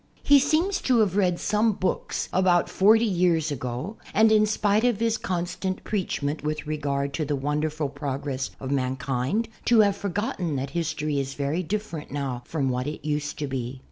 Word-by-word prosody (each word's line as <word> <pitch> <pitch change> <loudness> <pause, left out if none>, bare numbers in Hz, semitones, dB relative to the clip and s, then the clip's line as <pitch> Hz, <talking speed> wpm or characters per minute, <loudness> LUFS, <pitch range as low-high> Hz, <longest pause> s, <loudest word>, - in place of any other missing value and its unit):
He 285 0 +7
seems 320 +8 +1
to 255 -2 +3
have 195 -4 +1
read 180 -4 +2
some 215 +1 +2
books 190 -1 -2
about 180 -2 +3
forty 220 +4 +5
years 175 -6 +2
ago 130 - -4 0.2
and, 220 +1 +5
in 215 -1 +5
spite 210 0 +2
of 240 -4 +2
his 230 -1 +1
constant 185 0 -3
preachment 155 -8 -2
with 155 +1 -2
regard 140 -2 -2
to 160 - -1
the 145 0 -1
wonderful 150 +2 -1
progress 140 -1 -3
of 135 0 -5
mankind, 130 - -1 0.2
to 235 -2 +6
have 200 -2 +3
forgotten 195 -5 -2
that 135 +1 -3
history 155 -3 -1
is 135 0 -3
very 145 +5 -1
different 185 -4 -4
now 135 -4 -3
from 140 -5 -1
what 125 +1 -1
it 150 0 -5
used 150 0 -2
to 150 - -2
be. 130 -1 -4
160 Hz, 175 wpm, -25 LUFS, 140-205 Hz, 0.2 s, He